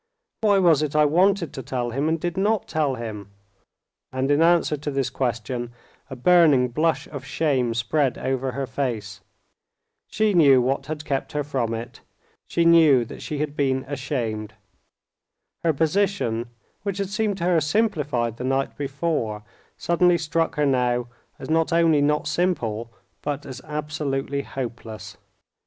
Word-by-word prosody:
Why 205 Hz, -2 st, +4 dB
was 170 Hz, -6 st, +4 dB
it 150 Hz, -1 st, -2 dB
I 150 Hz, 0 st, +5 dB
wanted 180 Hz, +3 st, +2 dB
to 135 Hz, -, -5 dB
tell 125 Hz, -1 st, -3 dB
him 140 Hz, +6 st, 0 dB
and 165 Hz, 0 st, 0 dB
did 175 Hz, +1 st, -3 dB
not 205 Hz, +2 st, +1 dB
tell 150 Hz, -4 st, 0 dB
him?" 110 Hz, -4 st, -7 dB, 0.8 s
And 130 Hz, +2 st, 0 dB
in 145 Hz, +2 st, +3 dB
answer 170 Hz, -2 st, +4 dB
to 150 Hz, +1 st, -5 dB
this 135 Hz, -2 st, -1 dB
question 120 Hz, -1 st, -3 dB, 0.4 s
a 130 Hz, -, -6 dB
burning 145 Hz, -3 st, +5 dB
blush 155 Hz, +6 st, 0 dB
of 140 Hz, -3 st, -7 dB
shame 135 Hz, -4 st, 0 dB
spread 125 Hz, +4 st, 0 dB
over 130 Hz, -1 st, -2 dB
her 135 Hz, +1 st, -2 dB
face. 110 Hz, -6 st, -4 dB, 0.9 s
She 215 Hz, -1 st, +1 dB
knew 140 Hz, -7 st, +6 dB
what 130 Hz, +2 st, -1 dB
had 155 Hz, 0 st, -5 dB
kept 135 Hz, -1 st, -2 dB
her 150 Hz, 0 st, -1 dB
from 125 Hz, -5 st, -2 dB
it, 115 Hz, +2 st, -8 dB, 0.5 s
she 170 Hz, -, +1 dB
knew 160 Hz, -7 st, +6 dB
that -, -, -10 dB
she 150 Hz, -, -4 dB
had 150 Hz, 0 st, -3 dB
been 135 Hz, -2 st, 0 dB
ashamed. 120 Hz, -6 st, -3 dB, 1.1 s
Her 165 Hz, -, +3 dB
position, 160 Hz, -, 0 dB, 0.3 s
which 200 Hz, -2 st, -3 dB
had 200 Hz, -1 st, -2 dB
seemed 210 Hz, -1 st, -1 dB
to 170 Hz, -, -4 dB
her 175 Hz, -2 st, +3 dB
simplified 150 Hz, -, 0 dB
the -, -, -5 dB
night 135 Hz, +1 st, -1 dB
before, 135 Hz, -7 st, -2 dB, 0.3 s
suddenly 175 Hz, +1 st, +3 dB
struck 165 Hz, 0 st, -1 dB
her 150 Hz, -1 st, +1 dB
now 125 Hz, -3 st, +1 dB, 0.3 s
as -, -, -8 dB
not 160 Hz, +1 st, +1 dB
only 165 Hz, -3 st, +4 dB
not 150 Hz, +1 st, +1 dB
simple, 120 Hz, -11 st, -1 dB, 0.3 s
but 145 Hz, -1 st, -3 dB
as 130 Hz, -2 st, -8 dB
absolutely 150 Hz, -2 st, -3 dB
hopeless. 120 Hz, -5 st, -7 dB
145 Hz, 155 wpm, -24 LUFS, 125-165 Hz, 1.1 s, knew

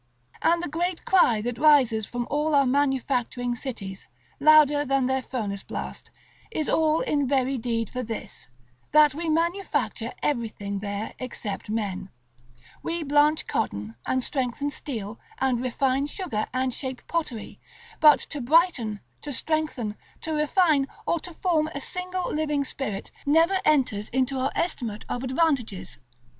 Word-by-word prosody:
And 340 Hz, +1 st, +3 dB
the -, -, -1 dB
great 340 Hz, +3 st, -2 dB
cry 245 Hz, -, +4 dB
that 240 Hz, 0 st, -3 dB
rises 260 Hz, -8 st, +5 dB
from 245 Hz, -1 st, -3 dB
all 300 Hz, +1 st, +1 dB
our 280 Hz, -1 st, +5 dB
manufacturing 255 Hz, -2 st, 0 dB
cities, 205 Hz, -7 st, -6 dB, 0.3 s
louder 295 Hz, -1 st, +6 dB
than 275 Hz, -2 st, +1 dB
their 265 Hz, +1 st, +1 dB
furnace 210 Hz, -6 st, -4 dB
blast, -, -, -6 dB, 0.4 s
is 315 Hz, -9 st, -2 dB
all 315 Hz, 0 st, +3 dB
in 285 Hz, -2 st, +1 dB
very 265 Hz, -1 st, +1 dB
deed 230 Hz, -1 st, -1 dB
for 255 Hz, -, -3 dB
this, 225 Hz, -2 st, -6 dB, 0.5 s
that 300 Hz, -2 st, +7 dB
we 325 Hz, +3 st, -3 dB
manufacture 340 Hz, +5 st, 0 dB
everything 215 Hz, -7 st, -2 dB
there 205 Hz, +1 st, -4 dB
except 215 Hz, -6 st, -5 dB
men; 205 Hz, -3 st, -2 dB, 0.7 s
we 335 Hz, 0 st, -2 dB
blanch 295 Hz, +1 st, +3 dB
cotton, 105 Hz, +2 st, -2 dB
and 260 Hz, -1 st, +1 dB
strengthen 270 Hz, +2 st, -2 dB
steel, 225 Hz, -8 st, -5 dB, 0.2 s
and 255 Hz, -2 st, +1 dB
refine 260 Hz, +2 st, +1 dB
sugar, 295 Hz, -, -3 dB
and 255 Hz, 0 st, 0 dB
shape 260 Hz, -1 st, -5 dB
pottery; 305 Hz, -10 st, -3 dB, 0.4 s
but 300 Hz, -1 st, +8 dB
to 290 Hz, -, -6 dB
brighten, 250 Hz, -, +2 dB, 0.2 s
to 295 Hz, -, -5 dB
strengthen, 280 Hz, -6 st, -1 dB, 0.3 s
to 320 Hz, -, -3 dB
refine, 300 Hz, -2 st, +3 dB, 0.2 s
or 340 Hz, -, +1 dB
to 345 Hz, 0 st, -10 dB
form 320 Hz, -4 st, +1 dB
a -, -, -2 dB
single 365 Hz, +3 st, -3 dB
living 300 Hz, -2 st, 0 dB
spirit, 235 Hz, -7 st, -5 dB, 0.2 s
never 330 Hz, +6 st, +4 dB
enters 250 Hz, -9 st, +2 dB
into 260 Hz, +1 st, 0 dB
our 265 Hz, +1 st, 0 dB
estimate 235 Hz, -11 st, -2 dB
of 245 Hz, -, -2 dB
advantages. 260 Hz, -, 0 dB
270 Hz, 145 wpm, -26 LUFS, 235-310 Hz, 0.7 s, but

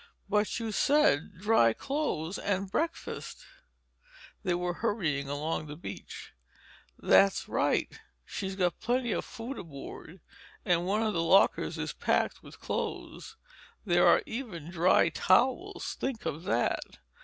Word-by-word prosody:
"But 210 Hz, +3 st, +1 dB
you 225 Hz, -1 st, -3 dB
said 210 Hz, -, +2 dB
'dry 185 Hz, -, +4 dB
clothes 200 Hz, -, -2 dB
and 195 Hz, -1 st, -1 dB
breakfast'—" 335 Hz, -, -3 dB, 1.0 s
They 180 Hz, -4 st, 0 dB
were 175 Hz, 0 st, -1 dB
hurrying 160 Hz, -11 st, 0 dB
along 155 Hz, +2 st, -2 dB
the 150 Hz, -, -7 dB
beach. 170 Hz, -, -9 dB, 0.6 s
"That's 195 Hz, 0 st, +4 dB
right. -, -, +1 dB, 0.4 s
She's 190 Hz, -1 st, -4 dB
got 180 Hz, -2 st, 0 dB
plenty 240 Hz, 0 st, 0 dB
of -, -, -1 dB
food 255 Hz, +2 st, -7 dB
aboard—and 170 Hz, +3 st, -5 dB
one 210 Hz, +3 st, +1 dB
of 215 Hz, -1 st, 0 dB
the 165 Hz, -, 0 dB
lockers 190 Hz, +4 st, +3 dB
is -, -, -3 dB
packed -, -, 0 dB
with -, -, -14 dB
clothes. 450 Hz, -, -5 dB, 0.5 s
There 175 Hz, -2 st, +4 dB
are -, -, +5 dB
even 195 Hz, -, -6 dB
dry 175 Hz, 0 st, +4 dB
towels, 260 Hz, -, +1 dB
think 260 Hz, -4 st, -3 dB
of 160 Hz, +5 st, -4 dB
that! -, -, -1 dB
195 Hz, 130 wpm, -30 LUFS, 170-230 Hz, 1.0 s, are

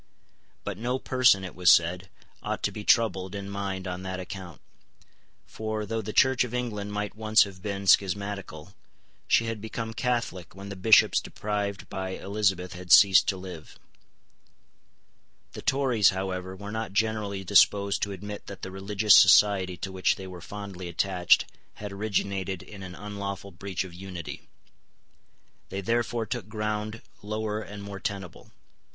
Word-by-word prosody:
But 100 Hz, -2 st, -5 dB
no 125 Hz, +3 st, -1 dB
person, 130 Hz, -7 st, +3 dB
it 90 Hz, -, -6 dB
was 90 Hz, -1 st, +5 dB
said, 90 Hz, +3 st, +3 dB, 0.3 s
ought -, -, -4 dB
to -, -, +1 dB
be 105 Hz, -, -7 dB
troubled 105 Hz, -5 st, +2 dB
in 100 Hz, -1 st, -5 dB
mind 100 Hz, -1 st, -4 dB
on 90 Hz, 0 st, -4 dB
that 95 Hz, 0 st, -5 dB
account; 90 Hz, -4 st, -8 dB, 0.9 s
for, 110 Hz, -1 st, -4 dB
though 115 Hz, +2 st, -2 dB
the 110 Hz, +1 st, -5 dB
Church 130 Hz, +2 st, +4 dB
of 125 Hz, -1 st, -5 dB
England 105 Hz, -5 st, -3 dB
might 105 Hz, 0 st, -3 dB
once 110 Hz, +1 st, +4 dB
have 95 Hz, -2 st, -10 dB
been 100 Hz, 0 st, -4 dB
schismatical, 100 Hz, -3 st, +1 dB, 0.5 s
she 115 Hz, -, +4 dB
had 115 Hz, -2 st, -4 dB
become 115 Hz, +1 st, -5 dB
Catholic 115 Hz, -9 st, -2 dB
when 100 Hz, +1 st, -9 dB
the 100 Hz, -, -6 dB
Bishops 105 Hz, +4 st, +5 dB
deprived 100 Hz, -1 st, -4 dB
by 95 Hz, 0 st, -4 dB
Elizabeth 95 Hz, -3 st, -1 dB
had 90 Hz, 0 st, -8 dB
ceased 95 Hz, -2 st, +8 dB
to 95 Hz, -, 0 dB
live. 90 Hz, -4 st, -10 dB, 1.7 s
The -, -, -8 dB
Tories, 130 Hz, -6 st, +3 dB
however, 95 Hz, -1 st, -4 dB
were 100 Hz, +2 st, -8 dB
not 110 Hz, -3 st, -4 dB
generally 105 Hz, -2 st, -1 dB
disposed 100 Hz, +1 st, +4 dB
to 100 Hz, -, -1 dB
admit 105 Hz, +2 st, -7 dB
that 100 Hz, -2 st, -9 dB
the 95 Hz, -, -5 dB
religious 100 Hz, +2 st, +3 dB
society 95 Hz, -1 st, +6 dB
to 95 Hz, -, -5 dB
which 95 Hz, 0 st, +1 dB
they 95 Hz, -, -9 dB
were 90 Hz, -2 st, -9 dB
fondly 100 Hz, -1 st, -7 dB
attached 90 Hz, +1 st, +3 dB, 0.3 s
had 105 Hz, -1 st, -7 dB
originated 100 Hz, -2 st, -2 dB
in 100 Hz, -2 st, -11 dB
an 90 Hz, -1 st, -8 dB
unlawful 100 Hz, -1 st, -6 dB
breach 95 Hz, +1 st, -4 dB
of 95 Hz, -2 st, -10 dB
unity. 90 Hz, -2 st, -8 dB, 1.2 s
They 95 Hz, +1 st, -4 dB
therefore 115 Hz, +2 st, 0 dB
took 110 Hz, -2 st, -4 dB
ground 105 Hz, 0 st, -3 dB, 0.2 s
lower 110 Hz, 0 st, -3 dB
and 100 Hz, -1 st, -9 dB
more 100 Hz, -1 st, -7 dB
tenable. 95 Hz, -2 st, -6 dB
100 Hz, 155 wpm, -27 LUFS, 95-105 Hz, 1.7 s, ceased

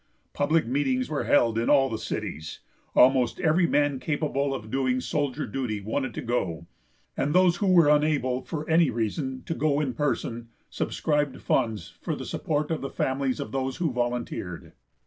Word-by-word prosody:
Public 155 Hz, +1 st, +2 dB
meetings 130 Hz, 0 st, 0 dB
were 150 Hz, -, -1 dB
held 115 Hz, -5 st, +3 dB
in 115 Hz, -, 0 dB
all 135 Hz, -2 st, +5 dB
the 110 Hz, -4 st, -4 dB
cities; 80 Hz, -7 st, -5 dB, 0.3 s
almost 125 Hz, -2 st, +4 dB
every 170 Hz, +2 st, +3 dB
man 145 Hz, -3 st, +1 dB
capable 145 Hz, 0 st, -1 dB
of 110 Hz, -5 st, -5 dB
doing 130 Hz, -1 st, +1 dB
soldier 140 Hz, 0 st, -2 dB
duty 110 Hz, -2 st, -3 dB
wanted 115 Hz, +4 st, -3 dB
to -, -, -4 dB
go, 90 Hz, -9 st, -2 dB, 0.5 s
and 145 Hz, +3 st, -1 dB
those 180 Hz, -1 st, +5 dB
who 200 Hz, -, 0 dB
were 175 Hz, -4 st, +6 dB
unable, 145 Hz, -4 st, +2 dB
for 155 Hz, +1 st, -5 dB
any 165 Hz, -2 st, +4 dB
reason, 130 Hz, +3 st, -3 dB
to -, -, -2 dB
go 150 Hz, -2 st, +1 dB
in 140 Hz, -4 st, -1 dB
person, 120 Hz, -3 st, -2 dB, 0.2 s
subscribed 150 Hz, -3 st, -1 dB
funds 110 Hz, -5 st, -1 dB
for -, -, -2 dB
the -, -, -7 dB
support 150 Hz, 0 st, -2 dB
of 160 Hz, -, -1 dB
the 135 Hz, -, -4 dB
families 130 Hz, -1 st, -1 dB
of 105 Hz, -, -5 dB
those 130 Hz, 0 st, -2 dB
who 165 Hz, -5 st, 0 dB
volunteered. 120 Hz, -7 st, -3 dB
135 Hz, 170 wpm, -26 LUFS, 120-150 Hz, 0.5 s, were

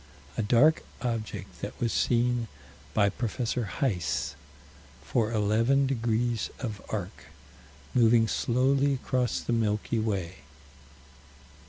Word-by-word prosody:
A -, -, 0 dB
dark 125 Hz, +9 st, +4 dB, 0.2 s
object 110 Hz, -5 st, -4 dB
that 100 Hz, -, -6 dB
was 115 Hz, -2 st, 0 dB
seen 120 Hz, -1 st, +1 dB, 0.5 s
by 105 Hz, -2 st, +4 dB
Prof. 110 Hz, +2 st, -3 dB, 0.2 s
Heis, 105 Hz, -4 st, -1 dB, 0.7 s
for 115 Hz, -1 st, 0 dB
eleven 115 Hz, +6 st, +2 dB
degrees 120 Hz, -3 st, 0 dB
of 110 Hz, -6 st, -5 dB
arc, 100 Hz, -1 st, -5 dB, 0.7 s
moving 115 Hz, -2 st, +5 dB
slowly 135 Hz, +5 st, +2 dB
across 125 Hz, -1 st, -1 dB
the 120 Hz, -, -2 dB
Milky 110 Hz, 0 st, 0 dB
Way. 95 Hz, -5 st, -2 dB
115 Hz, 105 wpm, -28 LUFS, 105-125 Hz, 0.7 s, moving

